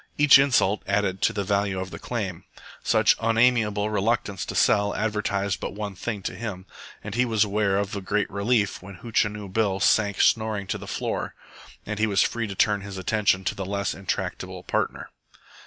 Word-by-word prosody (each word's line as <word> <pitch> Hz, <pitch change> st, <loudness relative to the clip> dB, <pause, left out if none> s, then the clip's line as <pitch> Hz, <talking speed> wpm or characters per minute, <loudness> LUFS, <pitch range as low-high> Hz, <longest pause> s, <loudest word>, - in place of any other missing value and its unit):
Each 145 Hz, -2 st, +8 dB
insult 120 Hz, -7 st, +3 dB
added 100 Hz, -1 st, 0 dB
to -, -, +3 dB
the 100 Hz, -, -2 dB
value 100 Hz, -1 st, 0 dB
of 95 Hz, 0 st, -5 dB
the -, -, -8 dB
claim. 95 Hz, -7 st, -4 dB, 0.4 s
Such -, -, +4 dB
unamiable 115 Hz, -2 st, +2 dB
reluctance 105 Hz, -1 st, -1 dB
to -, -, -5 dB
sell 100 Hz, 0 st, +3 dB
advertised 100 Hz, -2 st, -1 dB
but -, -, -5 dB
one 105 Hz, -1 st, -4 dB
thing 100 Hz, +1 st, -5 dB
to -, -, -3 dB
him, 95 Hz, -2 st, -6 dB, 0.4 s
and 105 Hz, -, -6 dB
he 125 Hz, +3 st, +2 dB
was 110 Hz, -4 st, +2 dB
aware 100 Hz, -1 st, +1 dB
of 100 Hz, +1 st, -2 dB
a 100 Hz, -, -4 dB
great 105 Hz, +2 st, 0 dB
relief 105 Hz, +1 st, 0 dB
when 100 Hz, +1 st, -10 dB
Hootchinoo 105 Hz, -3 st, -1 dB
Bill 100 Hz, -3 st, +1 dB
sank 100 Hz, -1 st, +2 dB
snoring 110 Hz, -3 st, +2 dB
to 95 Hz, -, -3 dB
the -, -, -9 dB
floor, -, -, -3 dB, 0.5 s
and 105 Hz, 0 st, -4 dB
he 110 Hz, -, +2 dB
was 100 Hz, -1 st, +3 dB
free 115 Hz, -1 st, -2 dB
to 100 Hz, -, -6 dB
turn 105 Hz, +1 st, +2 dB
his 100 Hz, -1 st, -8 dB
attention 100 Hz, -1 st, +1 dB
to -, -, -2 dB
his 95 Hz, -1 st, -5 dB
less 100 Hz, 0 st, -1 dB
intractable 95 Hz, 0 st, -4 dB
partner. -, -, -2 dB
105 Hz, 190 wpm, -25 LUFS, 100-110 Hz, 0.5 s, Each